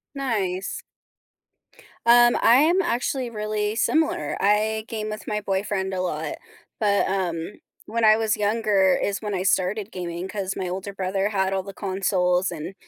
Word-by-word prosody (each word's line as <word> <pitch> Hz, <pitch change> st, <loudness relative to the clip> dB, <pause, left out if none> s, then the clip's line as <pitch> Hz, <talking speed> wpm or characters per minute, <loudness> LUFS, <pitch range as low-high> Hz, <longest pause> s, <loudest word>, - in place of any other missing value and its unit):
Nice. 200 Hz, -9 st, -2 dB, 1.2 s
Um, 240 Hz, 0 st, +6 dB
I 235 Hz, -, +6 dB
am 325 Hz, +8 st, +4 dB
actually 255 Hz, -4 st, -1 dB
really 215 Hz, -1 st, -2 dB
similar, 270 Hz, -, +1 dB
I 215 Hz, +2 st, +2 dB
game 215 Hz, -1 st, -4 dB
with 215 Hz, 0 st, -7 dB
my 210 Hz, -1 st, -1 dB
boyfriend 195 Hz, -1 st, -2 dB
a 185 Hz, -, -1 dB
lot. 160 Hz, -4 st, -3 dB, 0.4 s
But, 200 Hz, -2 st, +2 dB
um, 180 Hz, -2 st, -2 dB, 0.3 s
when 230 Hz, +1 st, -2 dB
I 215 Hz, 0 st, +7 dB
was 220 Hz, -1 st, 0 dB
younger 205 Hz, -3 st, +2 dB
is 200 Hz, 0 st, -1 dB
when 210 Hz, -2 st, -3 dB
I 185 Hz, -, -2 dB
started 195 Hz, +3 st, 0 dB
gaming, 175 Hz, 0 st, -5 dB
'cause 195 Hz, -1 st, -4 dB
my 185 Hz, -, -3 dB
older 190 Hz, +3 st, -5 dB
brother 195 Hz, +1 st, -1 dB
had 190 Hz, -2 st, 0 dB
all 190 Hz, -, 0 dB
the 195 Hz, +1 st, -9 dB
consoles 185 Hz, -2 st, 0 dB
and, 170 Hz, +2 st, -6 dB
200 Hz, 160 wpm, -24 LUFS, 190-220 Hz, 1.2 s, I